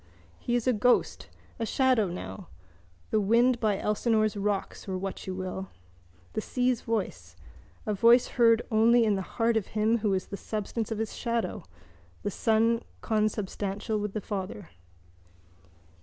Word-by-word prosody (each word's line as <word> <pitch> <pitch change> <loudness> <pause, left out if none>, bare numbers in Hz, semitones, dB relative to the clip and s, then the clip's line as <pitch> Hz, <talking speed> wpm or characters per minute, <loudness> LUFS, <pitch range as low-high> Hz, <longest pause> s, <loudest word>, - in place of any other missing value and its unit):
He 240 - -1
is 240 - 0
a 255 - +3
ghost, 240 +3 +1 0.3
a - - -1
shadow 255 -6 +3
now, 95 - -7 0.6
the 215 - +3
wind 235 +4 +3
by 215 -4 +1
Elsinore's 215 +1 +1
rocks 200 0 -2
or 185 - -1
what 195 +1 -5
you 185 - -3
will, 185 0 -5 0.6
the 215 - -1
sea's 250 +1 0
voice, 95 - -3 0.5
a 210 - 0
voice 235 +4 +5
heard 230 -1 +4
only 230 +2 +5
in 215 -2 +3
the 195 - -1 0.2
heart 230 -1 +2
of 215 - -2
him 220 +2 +3
who 205 -3 +1
is 185 - -2
the 200 - -5
substance 215 +1 -3
of 220 - -3
his 220 0 -3
shadow, 235 -1 -2 0.6
the 205 - -1
son 225 +3 +2 0.2
consubstantial 210 -1 -1
with 205 -1 -3
the 215 - -3
father. 195 -2 -5
215 Hz, 155 wpm, -28 LUFS, 200-230 Hz, 0.6 s, voice